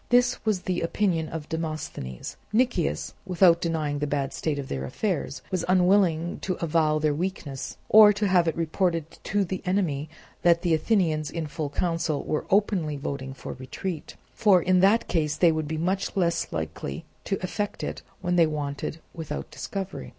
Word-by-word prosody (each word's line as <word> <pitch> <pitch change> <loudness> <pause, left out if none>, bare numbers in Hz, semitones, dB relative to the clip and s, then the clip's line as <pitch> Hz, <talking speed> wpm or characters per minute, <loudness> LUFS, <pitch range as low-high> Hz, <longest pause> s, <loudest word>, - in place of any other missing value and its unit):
This 245 0 +3
was 205 -4 +2
the 180 -1 -1
opinion 165 -2 0
of 160 -2 -6
Demosthenes. 155 - -5 0.2
Nicias, 245 +3 +1
without 180 -2 +4
denying 155 -4 -1
the 150 - -1
bad 140 -1 -1
state 155 -3 -2
of 140 -2 -4
their 65 -1 -3
affairs, 145 - -2
was 185 -2 0
unwilling 180 -2 +3
to 185 - -2
avow 155 -2 +1
their 155 -1 +1
weakness, 150 -5 -4
or 215 -1 +9
to 205 0 0
have 180 -3 +4
it 165 - +1
reported 165 0 0 0.2
to 200 0 +1
the 185 +1 -4
enemy 175 -7 0 0.3
that 170 0 +4
the 170 -2 +2
Athenians 160 -4 +1
in 165 -1 -3
full 150 0 -4
council 165 -1 -1
were 150 - -2
openly 190 -7 +2
voting 135 -1 -5
for - - -7
retreat; 155 +6 -5 0.2
for 205 -5 +5
in 180 +1 +3
that 200 +5 +4
case 155 -3 0
they 170 -2 +5
would 155 -1 -2
be 160 +1 -3
much 190 +5 -1
less 170 -2 +1
likely 80 -3 -4 0.2
to 195 - 0
effect 205 +3 -3
it - - -4 0.2
when 180 -1 0
they 165 -2 +6
wanted 145 0 -3 0.2
without 155 -3 -5
discovery. 195 -1 -5
165 Hz, 170 wpm, -26 LUFS, 150-185 Hz, 0.3 s, or